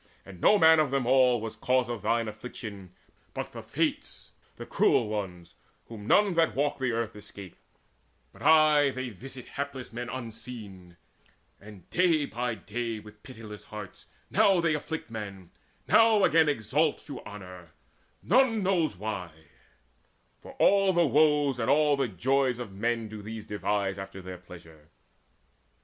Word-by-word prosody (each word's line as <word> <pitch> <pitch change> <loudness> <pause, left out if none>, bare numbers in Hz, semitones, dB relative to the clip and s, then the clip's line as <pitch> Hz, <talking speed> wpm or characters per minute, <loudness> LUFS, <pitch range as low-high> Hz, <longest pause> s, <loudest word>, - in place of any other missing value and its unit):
And 95 -3 -12
no 210 - +6
man 160 -3 +6
of 155 -3 +2
them 135 -2 0
all 125 -1 +4
Was 110 0 -6
cause 125 +2 +1
of 120 -3 -5
thine 115 +2 0
affliction, 105 -3 -8 0.5
but - - -4
the - - -8
Fates, - - -3 0.2
The - - -8
cruel 115 - +2
ones, 95 -5 -5 0.4
whom 110 -2 -9
none 205 - +4
that 165 -9 +2
walk 145 +2 0
the 130 -2 0
earth 115 -1 -2
Escape, 100 -3 -10 0.8
but - - -17
aye 155 -2 +5
they 130 -1 -4
visit 125 +4 -10
hapless 140 -4 -6
men 120 +1 -5
Unseen; 110 -7 -9 0.6
and 100 -4 -14
day 170 -5 +3
by 120 -2 -3
day 115 +3 -4
with 105 0 -15
pitiless 110 -5 -11
hearts 105 -3 -10 0.2
Now 195 -3 +4
they 165 -2 +2
afflict 150 -4 -5
men, 100 -5 -7 0.4
now 225 -2 +5
again 160 -3 +4
exalt 145 +4 0
To 145 - -8
honour 90 -4 -10 0.5
none 230 -1 +3
knows 170 - +1
why; 95 -4 -4 1.1
for - - -12
all 195 -1 +4
the 175 -1 +3
woes 145 -3 +3
And 115 - -1
all 150 0 +4
the 135 -2 0
joys 130 +6 +1
of 120 -5 -7
men 115 +2 -1
do 110 0 -8
these 110 0 -7
devise 100 -2 -2
After 95 0 -8
their 90 -1 -8
pleasure." 80 -4 -15
120 Hz, 155 wpm, -28 LUFS, 105-145 Hz, 1.1 s, no